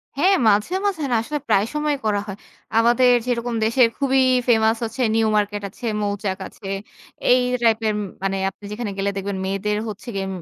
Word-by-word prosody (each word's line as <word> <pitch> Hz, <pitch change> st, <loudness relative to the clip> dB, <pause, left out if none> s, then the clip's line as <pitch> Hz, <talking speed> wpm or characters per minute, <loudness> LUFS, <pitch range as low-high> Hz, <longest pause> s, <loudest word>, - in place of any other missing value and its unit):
হ্যাঁ, 370 Hz, +8 st, +4 dB
মাঝে, 210 Hz, -, +2 dB
মাঝে 390 Hz, -6 st, 0 dB
না -, -, +3 dB
আসলে 295 Hz, +6 st, -4 dB
প্রায় 195 Hz, -, +3 dB
সময় 300 Hz, -1 st, 0 dB
করা 210 Hz, -1 st, +1 dB
হয়। 195 Hz, -1 st, -6 dB, 0.4 s
আমাদের 240 Hz, +2 st, +5 dB
যেরকম 240 Hz, -1 st, -1 dB
দেশের 230 Hz, +2 st, +4 dB
খুবই 270 Hz, -1 st, +2 dB, 0.3 s
ফেমাস 225 Hz, -1 st, +3 dB
হচ্ছে 230 Hz, +3 st, -4 dB
নিউ 225 Hz, -1 st, +3 dB
মার্কেট 205 Hz, 0 st, -1 dB
আছে, 220 Hz, -, -10 dB, 0.2 s
মৌচাক 200 Hz, -1 st, -2 dB
আছে। 195 Hz, -, -12 dB, 0.6 s
এই 250 Hz, -, +6 dB, 0.2 s
টাইপের 220 Hz, -1 st, +2 dB, 0.3 s
মানে 195 Hz, 0 st, 0 dB
আপনি 195 Hz, -, -21 dB
যেখানে 210 Hz, 0 st, -4 dB
গেলে 195 Hz, +1 st, 0 dB
দেখবেন 195 Hz, 0 st, -3 dB
মেয়েদের 195 Hz, +2 st, -1 dB
হচ্ছে 215 Hz, +4 st, -9 dB
গিয়ে 195 Hz, 0 st, -2 dB
220 Hz, 175 wpm, -22 LUFS, 205-245 Hz, 0.6 s, এই